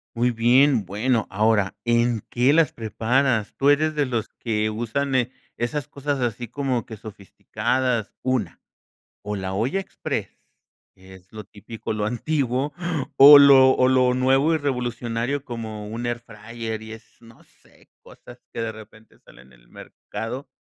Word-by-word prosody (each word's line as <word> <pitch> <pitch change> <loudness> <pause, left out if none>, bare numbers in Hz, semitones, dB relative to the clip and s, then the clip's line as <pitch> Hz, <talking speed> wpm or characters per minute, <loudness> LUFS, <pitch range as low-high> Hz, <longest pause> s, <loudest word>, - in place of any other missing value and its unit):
Muy 120 +1 +1
bien, 120 +1 +3
bueno, 110 +3 0
ahora, 105 -1 +1
¿en 120 -2 +1
qué 125 +3 +3
las 155 -2 +3
preparas?, 115 +1 0
¿tú 140 - +3
eres 155 +2 +3
de 145 -2 0
los 115 -4 -2
que 110 -2 -1
usan, 120 +5 -2
eh, 125 -1 +1 0.2
esas 135 +5 -3
cosas, 145 -1 -3
así 120 -1 -3
como 130 -1 -2
que, 110 - -9
sofisticadas, 110 +3 -3
una, 130 -2 -2 0.6
o 105 0 -4
la 95 -1 -4
olla 125 - -1
exprés, 195 - -4 0.7
que 95 0 -16
es 95 0 -20
lo 110 -1 -8
típico, 110 +3 -8
lo 105 -1 -2
antiguo 135 +2 -1 0.4
o 145 +1 +11
lo 135 -2 +7
o 130 - +3
lo 130 -1 +3
nuevo 135 +5 +2
y - - +1
revolucionario 125 -1 -3
como 110 -4 -6
un 115 +3 -5
air 120 0 -2
fryer 115 -1 -7
y 110 0 -9
es 110 +1 -13 0.2
no 115 0 -18
sé, - - -27
cosas - - -15
que - - -4
de 115 -1 -3
repente 110 0 -16
salen 60 +2 -19
en - - -21
el - - -26
mercado?, 130 +5 -8
120 Hz, 160 wpm, -23 LUFS, 110-130 Hz, 0.7 s, o